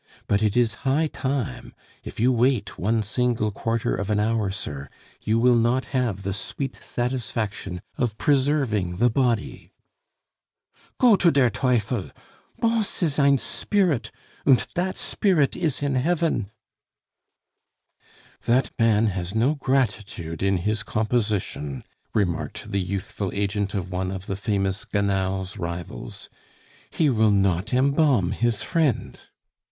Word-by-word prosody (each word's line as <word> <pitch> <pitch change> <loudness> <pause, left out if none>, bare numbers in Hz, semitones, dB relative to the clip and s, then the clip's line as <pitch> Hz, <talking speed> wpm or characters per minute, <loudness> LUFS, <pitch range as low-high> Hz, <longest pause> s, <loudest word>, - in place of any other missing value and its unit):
But 100 +1 +1
it 110 +1 +1
is 120 -2 +3
high 140 +4 +2
time; 135 - -3 0.3
if - - -9
you 125 +4 +4
wait 120 -3 +1
one 110 +3 +1
single 115 0 0
quarter 115 +2 -1
of 100 +1 -3
an 105 -1 +2
hour, 110 -1 +1
sir, 70 -7 -5 0.3
you 110 +1 +1
will 125 +2 +5
not 120 +2 +2
have 115 -7 0
the 95 0 -2
sweet 130 +8 -5
satisfaction 110 -7 -3 0.2
of 115 -4 0
preserving 130 - +1
the 120 +5 +3
body...." 120 -3 -1 1.2
"Go 240 -4 +6
to 175 - +4
der 135 -6 +3
teufel!... 120 -4 0 0.5
Bons 225 -4 0
is 150 -3 +1
ein 140 -1 +5
spirit 155 - 0 0.3
und 135 -3 +4
dat 185 +1 -1
spirit 170 -10 +1
is 155 -5 -1
in 140 -1 0
hefn." 150 - +1 2.0
"That 125 +3 +2
man 115 -1 +4
has 95 -2 -2
no 120 +7 +3
gratitude 105 - -1
in 95 0 +2
his 105 +4 -1
composition," 105 - -1 0.3
remarked 85 -1 -1
the 100 -1 +1
youthful 95 +1 -3
agent 100 0 -1
of 95 -2 -3
one 90 +1 -2
of 95 0 -5
the 100 - -3
famous 100 -1 -1
Gannal's 95 -3 -1
rivals; 85 0 -6 0.6
"he 155 -4 +2
will 110 -2 +3
not 95 -1 +1
embalm 130 - +3
his 115 +1 0
friend." 155 -8 0
110 Hz, 130 wpm, -24 LUFS, 100-130 Hz, 2.0 s, Go